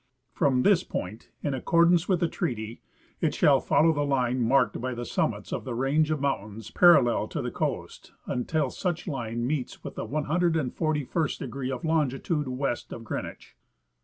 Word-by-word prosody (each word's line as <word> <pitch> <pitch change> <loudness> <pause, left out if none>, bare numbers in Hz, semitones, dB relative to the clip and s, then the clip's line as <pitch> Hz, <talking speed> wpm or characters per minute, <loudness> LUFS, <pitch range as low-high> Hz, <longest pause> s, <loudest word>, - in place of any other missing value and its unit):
From 130 -3 +2
this 195 -4 +4
point, 105 +5 -6
in 145 - -1
ac 130 - -3
cordance 170 +1 +4
with 185 -3 +2
the 170 - +3
treaty, 115 -6 -4 0.4
it - - 0
shall - - +5
follow 160 +1 +3
the 145 - -1
line 130 -3 +1
marked 120 +1 +2
by 130 0 -3
the 120 0 -5
summits - - -2
of - - -3
the 125 -3 -4
range 140 +5 +2
of 155 -2 0
mountains 110 -5 -3
parallel 170 -9 +5
to - - -5
the - - -3
coast - - -4
until 150 +5 -1
such 175 -2 -3
line 120 -6 -3
meets 135 -1 -3
with - - -6
the - - -5
141st 155 0 0
degree 130 0 -5
of 130 +3 -4
longitude 150 -1 0
west 130 -1 -3
of 115 - -7
Green 110 - -3
wich. - - -12
140 Hz, 175 wpm, -27 LUFS, 125-160 Hz, 0.4 s, shall